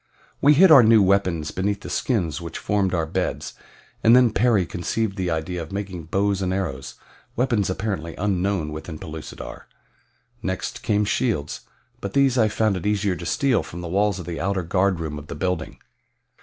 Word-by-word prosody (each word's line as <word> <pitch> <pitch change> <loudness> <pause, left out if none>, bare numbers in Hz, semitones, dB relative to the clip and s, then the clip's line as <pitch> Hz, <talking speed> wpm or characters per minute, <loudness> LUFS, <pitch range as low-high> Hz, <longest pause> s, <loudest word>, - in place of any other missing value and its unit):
We 145 +1 +6
hid 180 +3 +7
our 140 -5 +10
new 110 -2 +6
weapons 95 -5 +1
beneath 100 +2 -2
the - - -8
skins 90 - -1
which 85 -1 -6
formed 100 -2 0
our 85 -3 0
beds, 80 - -3 0.5
and 115 +2 +7
then 125 -2 +5
Perry 110 -6 +2
conceived 100 +5 -2
the 95 -3 -2
idea 80 +2 -2
of 80 - -8
making 95 -4 -5
bows 100 +3 0
and 95 -1 -1
arrows 80 -9 -3 0.4
weapons 120 -6 +1
apparently 95 -4 -3
unknown 95 -4 -1
within 80 +1 -7
Pellucidar. 80 0 -9 0.7
Next - - -4
came 105 0 +1
shields; 100 - -2 0.3
but 100 - -5
these 135 -2 +3
I 110 -4 +4
found 105 -2 +1
it 90 - -4
easier 100 -2 +1
to 85 0 -6
steal 135 +2 +2
from 85 - -8
the 85 - -5
walls 100 +3 +1
of 90 - -7
the 85 -3 -5
outer 95 0 -1
guardroom 85 -4 0
of 75 - -13
the - - -6
building. 90 -4 -3
95 Hz, 180 wpm, -23 LUFS, 85-105 Hz, 0.7 s, our